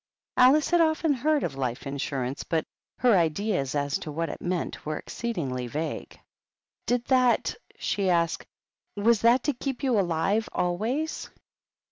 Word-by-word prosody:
Alice 275 +6 +5
had 345 -1 +5
often 315 -1 +2
heard 295 +3 +1
of 160 - -2
life 130 -2 -3
insurance, 135 -1 -3
but 160 -2 -1 0.3
her 245 -4 +4
ideas 165 -4 0
as 140 -1 0
to 155 - -6
what 165 +2 -2
it - - -7
meant 175 -1 -3
were 155 0 -3
exceedingly 140 - -3
vague. 155 +6 -5 0.3
" - - -60
Did 245 0 +1
that 255 -2 +3
— - - -28
" - - -34
she 195 -2 0
asked, 170 -2 +1 0.3
" - - -55
was 220 +2 +3
that 240 +2 +5
to 295 - +1
keep 265 +2 -4
you 250 -6 +3
alive 190 +5 +1
always?" 225 - -1
195 Hz, 165 wpm, -27 LUFS, 155-250 Hz, 0.3 s, Alice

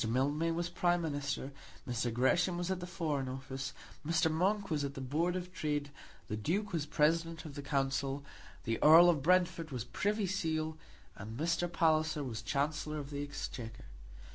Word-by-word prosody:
Mildmay 145 +7 +1
was 170 +1 -1
Prime 175 0 +1
Minister; 145 -3 -2 0.4
Mr. 120 -1 -1
Gresham 170 +9 +2
was 175 +1 -1
at 185 - -1
the 180 - -6
Foreign 150 -7 -2
Office; 135 +1 -5 0.3
Mr. 160 +1 +2
Monk 195 +4 +1
was 150 -2 +1
at 140 0 -3
the - - -5
Board 155 +7 0
of 180 0 -5
Trade; 145 -4 -2 0.4
the 105 - -2
Duke 185 - -1
was 155 -3 -1
President 165 +2 +1
of 150 - -7
the 145 - -5
Council; 135 0 -1 0.4
the 115 0 -2
Earl 165 +3 +9
of 155 -5 -1
Brentford 175 0 +2
was 125 -4 -3
Privy 205 - 0
Seal; 160 -4 -1 0.4
and 110 +4 -7
Mr. 170 +2 0
Palliser 155 -2 +2
was 115 -4 -4
Chancellor 150 +4 -1
of 145 -1 -6
the 145 0 -3
Exchequer. 125 -5 -6
155 Hz, 170 wpm, -33 LUFS, 135-170 Hz, 0.4 s, Earl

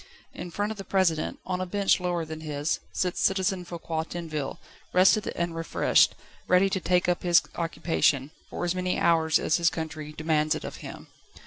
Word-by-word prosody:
In 175 - -7
front 205 +5 -2
of 215 - -7
the - - -4
President, 180 -5 +1
on 185 0 -2
a - - -1
bench 200 +1 +2
lower 175 -2 -1
than 160 0 -7
his, 150 0 -2
sits 180 -1 -1
Citizen 190 -1 +1
Foucquier 165 -2 -4
Tinville, 160 -4 -5 0.4
rested 190 +3 +4
and 170 -1 -2
refreshed, 165 -1 +3 0.3
ready 190 +2 +4
to 190 - 0
take 180 0 +1
up 180 -1 +1
his 175 -1 +4
occupation, 160 -4 0 0.2
for - - -3
as 175 - 0
many 185 0 -1
hours 160 -2 +3
as - - +1
his 170 -1 +3
country 155 -2 -6
demands 155 0 +1
it - - -6
of - - -6
him. - - -9
170 Hz, 185 wpm, -27 LUFS, 160-185 Hz, 0.4 s, rested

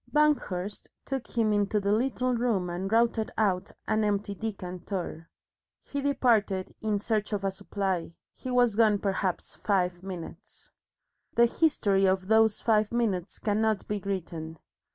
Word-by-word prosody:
Banghurst 210 -11 +1 0.2
took 270 -2 -3
him 220 -2 +3
into 205 +1 +1
the 200 0 0
little 250 +3 +1
room 225 -7 0
and 190 +3 -3
routed 230 -1 +2
out 195 -3 +1 0.2
an 215 0 +2
empty 205 -1 0
decanter. 180 -5 -5 0.5
He 285 - -5
departed 225 -9 +1
in 215 -2 0
search 215 0 -1
of 200 -1 -1
a 195 - +1
supply. 190 -3 -3 0.2
He 255 - -7
was 245 -3 +3
gone 215 -2 +4
perhaps 195 -2 -2
five 180 -3 0
minutes. 185 +1 -9 0.6
The 235 - +6
history 220 -8 +2
of 190 0 0
those 220 -1 +4
five 215 -2 +2
minutes 210 -6 -1
cannot 215 -1 0
be 210 0 -2
written. 165 -4 -4
205 Hz, 140 wpm, -28 LUFS, 190-225 Hz, 0.6 s, The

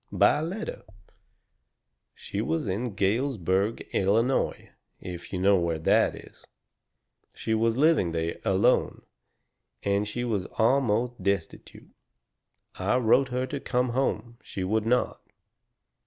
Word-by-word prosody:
"By - - +4
letter. 190 +7 -5 1.3
She - - -5
was 80 +6 -1
in 105 +3 -3
Galesburg, 100 - 0
Illinois, 115 +7 +1 0.3
if 85 -1 -8
you 95 - -2
know 95 +2 +4
where 85 -2 -1
that 80 - +2
is. - - -14 0.9
She 110 - -2
was 115 +1 +1
living 150 - +3
there 80 0 -3
alone. 95 0 +2 0.8
And 100 +1 +1
she 120 +3 -3
was 105 -6 -1
almost 120 -1 +1
destitute. 100 -3 -3 0.9
I 95 +6 +1
wrote 130 +3 +3
her 125 +1 -1
to 140 +1 -5
come 125 -1 0
home. 120 -2 -2
She 95 - -6
would 110 +3 0
not. 125 +1 +1
110 Hz, 120 wpm, -27 LUFS, 95-125 Hz, 1.3 s, By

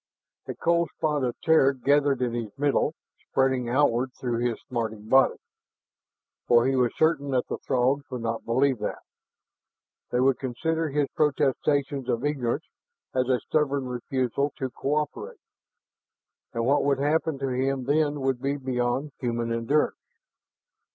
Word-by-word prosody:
A - - -4
cold 170 -1 +1
spot 150 -3 0
of 125 -2 -2
terror 155 -4 +5
gathered 140 0 +2
in 120 -2 -1
his 115 -3 -5
middle, 145 +2 +1 0.3
spreading 130 -2 +1
outward 130 -1 +2
through 120 -2 -1
his 120 -1 -1
smarting 110 -3 -4
body. 135 +3 +4 1.1
For 120 0 +5
he 135 0 +2
was 125 -2 +2
certain 155 -3 +2
that 130 -2 +1
the - - -3
Throgs 135 +2 0
would 125 -3 -5
not 115 0 -2
believe 130 +1 +2
that. - - -4 1.1
They 125 - 0
would 130 0 +3
consider 160 +5 -1
his 145 0 +1
protestations 140 -2 0
of 120 +4 0
ignorance 130 -5 -1 0.5
as 130 0 0
a 125 -1 +3
stubborn 140 -3 0
refusal 130 +2 -1
to 130 -2 -3
co 140 +5 -1
operate. 150 - -3 1.1
And 115 -1 -2
what 140 +3 +3
would 140 -1 +2
happen 150 +2 +1
to 135 0 -2
him 130 +1 -1
then 145 +1 +1
would 130 -2 0
be 140 +1 -1
beyond 130 +2 -1
human 115 -2 -1
endurance. 115 +6 +1
135 Hz, 150 wpm, -26 LUFS, 125-145 Hz, 1.1 s, terror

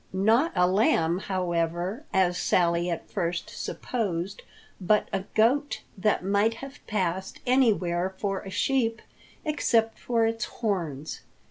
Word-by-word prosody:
Not 225 - +3
a 180 - +4
lamb, 180 -3 +2
however, 180 - -2
as 180 -2 +3
Sally 175 0 +2
at 170 - -4
first 170 -3 -2
supposed, 195 -5 -3 0.4
but 210 +3 +3
a 195 -1 -1
goat 270 +7 +2
that 205 -1 +1
might 205 +3 +2
have 275 +3 -9
passed 190 -2 -2
anywhere 190 -8 +2
for 195 -1 -1
a 195 - -9
sheep 230 +2 0 0.4
except 235 -7 +1
for 230 -2 +1
its 225 -1 -1
horns. 165 - -3
195 Hz, 125 wpm, -27 LUFS, 175-225 Hz, 0.4 s, a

